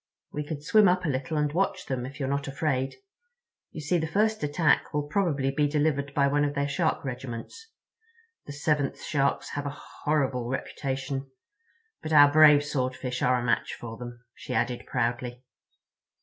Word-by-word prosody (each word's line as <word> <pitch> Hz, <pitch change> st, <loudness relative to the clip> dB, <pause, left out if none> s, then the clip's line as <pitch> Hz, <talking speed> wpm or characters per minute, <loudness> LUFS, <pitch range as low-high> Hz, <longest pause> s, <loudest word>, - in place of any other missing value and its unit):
"We 150 Hz, -, -3 dB
could 145 Hz, -1 st, -6 dB
swim 210 Hz, +6 st, +5 dB
up 180 Hz, +1 st, +2 dB
a -, -, 0 dB
little 145 Hz, +4 st, -2 dB
and 150 Hz, -1 st, 0 dB
watch 195 Hz, +4 st, 0 dB
them, 130 Hz, -2 st, -3 dB
if 140 Hz, -, -11 dB
you're 135 Hz, -, -1 dB
not 140 Hz, 0 st, -1 dB
afraid. 135 Hz, -2 st, -1 dB, 0.7 s
You 155 Hz, -, -8 dB
see, 170 Hz, +4 st, +1 dB
the 160 Hz, -, -2 dB
first 215 Hz, +5 st, +1 dB
attack 150 Hz, +1 st, +1 dB
will 150 Hz, -, +1 dB
probably 145 Hz, -4 st, 0 dB
be 145 Hz, +2 st, +1 dB
delivered 145 Hz, -1 st, 0 dB
by 140 Hz, -, +4 dB
one 145 Hz, +1 st, +2 dB
of 145 Hz, 0 st, -1 dB
their 140 Hz, 0 st, 0 dB
Shark 160 Hz, +1 st, 0 dB
regiments. 130 Hz, -, -6 dB, 0.8 s
The -, -, -6 dB
7th 145 Hz, -1 st, -1 dB
Sharks 140 Hz, -2 st, 0 dB
have 145 Hz, 0 st, -3 dB
a 140 Hz, +1 st, -6 dB, 0.3 s
horrible 135 Hz, -5 st, 0 dB
reputation. 135 Hz, 0 st, -3 dB, 0.7 s
But 155 Hz, -, -3 dB
our 145 Hz, -1 st, +8 dB
brave 150 Hz, -1 st, +7 dB
Swordfish 130 Hz, -2 st, -2 dB
are 125 Hz, 0 st, +3 dB
a -, -, -4 dB
match 115 Hz, -, 0 dB
for 115 Hz, -1 st, -8 dB
them," 120 Hz, 0 st, -9 dB
she -, -, -6 dB
added 125 Hz, -1 st, -1 dB
proudly. 120 Hz, 0 st, -2 dB
145 Hz, 175 wpm, -27 LUFS, 130-150 Hz, 0.8 s, our